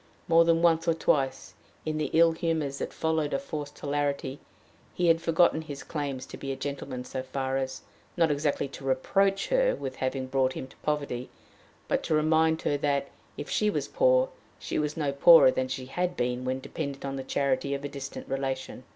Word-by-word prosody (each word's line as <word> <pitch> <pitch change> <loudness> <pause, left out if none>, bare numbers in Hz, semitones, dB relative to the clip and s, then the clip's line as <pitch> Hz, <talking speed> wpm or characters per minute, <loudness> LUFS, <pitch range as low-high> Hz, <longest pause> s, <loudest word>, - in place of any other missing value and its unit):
More 165 0 +6
than 165 0 +3
once 165 -1 +3
or 165 - +3
twice, 135 -4 0 0.3
in 155 0 -2
the 155 - -1
ill 165 +1 +6
humors 160 -4 -2
that - - -3
followed 160 -2 0
a - - +2
forced 155 - -6
hilarity, 140 -1 -2 0.6
he 175 -1 +2
had 165 0 +4
forgotten 165 -1 +3
his 145 -3 -8
claims 140 -4 -4
to - - -9
being 135 -1 -4
a - - -7
gentleman 135 -2 -5
so 130 - -4
far 130 0 -2
as 130 -1 -4 0.3
not 165 -3 +3
exactly 145 -1 0
to 135 - -10
reproach 195 +10 +1
her - - +3
with 130 -1 -6
having 130 0 -2
brought 130 0 +1
him - - -5
to - - -19
poverty 145 -5 -2 0.6
but - - +1
to 155 - +1
remind 160 +1 +3
her 145 - +1
that, 140 -1 0 0.3
if - - -5
she 210 - +1
was - - -1
poor, - - +3 0.3
she - - -3
was 150 0 -2
no 145 -3 0
poorer 140 0 +8
than 130 0 -1
she 130 0 -4
had 180 +6 -2
been 125 +1 -1
when 130 +1 -2
dependent 140 -1 -5
on 135 0 -3
the 135 - -4
charity 140 +1 0
of 140 - -6
a - - 0
distant 140 -1 -7
relation! 135 -1 -3
145 Hz, 200 wpm, -28 LUFS, 135-165 Hz, 0.6 s, poorer